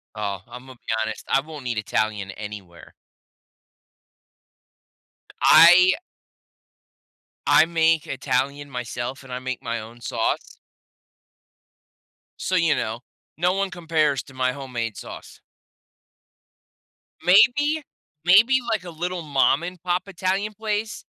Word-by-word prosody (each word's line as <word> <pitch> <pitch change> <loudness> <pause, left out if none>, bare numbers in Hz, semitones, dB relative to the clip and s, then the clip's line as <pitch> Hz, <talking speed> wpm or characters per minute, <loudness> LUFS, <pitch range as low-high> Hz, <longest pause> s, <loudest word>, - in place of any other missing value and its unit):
Oh, 100 -3 -3
Imma 130 +1 -10
be - - -31 0.2
honest. 110 0 -4
I - - +4
won't 150 -3 -9
eat 120 -2 -2
Italian 105 -2 -1
anywhere. 100 -5 -10 2.5
I 180 +2 +8 1.5
I 160 - +6
make 165 -2 +2
Italian 140 +2 -2
myself, 125 +1 -5
and 130 -1 -10
I 125 - -3
make 130 -1 -5
my 115 0 -3
own 115 +2 -11
sauce. - - -2 1.8
So, 185 - -1
you 165 -3 +3
know, 110 +2 -3 0.4
no 180 +2 +2
one 195 0 -1
compares 160 -5 0
to 135 - -16
my 130 0 0
homemade 125 -5 -5
sauce. - - -10 1.8
Maybe 290 - +4 0.4
maybe, 215 +9 +6
like, 215 - -1
a 175 - -8
little 175 +2 -4
mom 140 +1 +2
and 180 -1 -7
pop 180 +1 -1
Italian 195 +3 -2
place 215 0 -4
145 Hz, 115 wpm, -23 LUFS, 120-180 Hz, 2.5 s, I